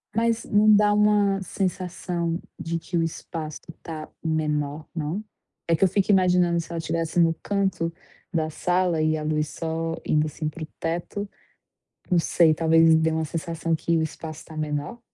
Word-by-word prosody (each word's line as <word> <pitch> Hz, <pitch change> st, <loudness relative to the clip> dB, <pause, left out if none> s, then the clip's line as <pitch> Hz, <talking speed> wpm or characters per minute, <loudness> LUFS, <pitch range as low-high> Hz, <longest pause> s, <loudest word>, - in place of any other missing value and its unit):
Mas 230 Hz, 0 st, +1 dB
não 210 Hz, +1 st, +5 dB
dá 210 Hz, 0 st, +4 dB
uma 205 Hz, -2 st, +3 dB
sensação 180 Hz, -3 st, -2 dB, 0.2 s
de 165 Hz, 0 st, -2 dB
que 175 Hz, +1 st, -3 dB
o 165 Hz, -, +2 dB
espaço 155 Hz, -1 st, -5 dB, 0.2 s
tá 155 Hz, -2 st, -7 dB
menor, 150 Hz, -1 st, -1 dB
não? 165 Hz, +6 st, -2 dB, 0.4 s
É 165 Hz, -, +4 dB
que 160 Hz, -, +1 dB
eu -, -, +7 dB
fico 195 Hz, +2 st, +1 dB
imaginando 180 Hz, -2 st, +4 dB
se 165 Hz, -, -6 dB
ela 170 Hz, -, -3 dB
estivesse 165 Hz, +1 st, -1 dB
no 165 Hz, -1 st, +5 dB
canto 190 Hz, -5 st, 0 dB, 0.4 s
da 160 Hz, -2 st, 0 dB
sala 175 Hz, 0 st, +1 dB
e 155 Hz, 0 st, +2 dB
a 155 Hz, -, -4 dB
luz 150 Hz, -1 st, 0 dB
só 165 Hz, +1 st, -3 dB
indo 150 Hz, 0 st, +2 dB
assim 155 Hz, +1 st, -3 dB
para 155 Hz, +1 st, -8 dB
o -, -, -6 dB
teto. 175 Hz, +5 st, -3 dB, 0.8 s
Não 180 Hz, -, +4 dB
sei, 165 Hz, -1 st, +4 dB
talvez 165 Hz, 0 st, +5 dB
dê 160 Hz, 0 st, +2 dB
uma 160 Hz, 0 st, 0 dB
sensação 165 Hz, +1 st, -2 dB
que 165 Hz, +1 st, 0 dB
o -, -, +1 dB
espaço 155 Hz, 0 st, -6 dB
tá 160 Hz, -, -11 dB
menor? 150 Hz, +7 st, -3 dB
165 Hz, 175 wpm, -25 LUFS, 155-180 Hz, 0.8 s, eu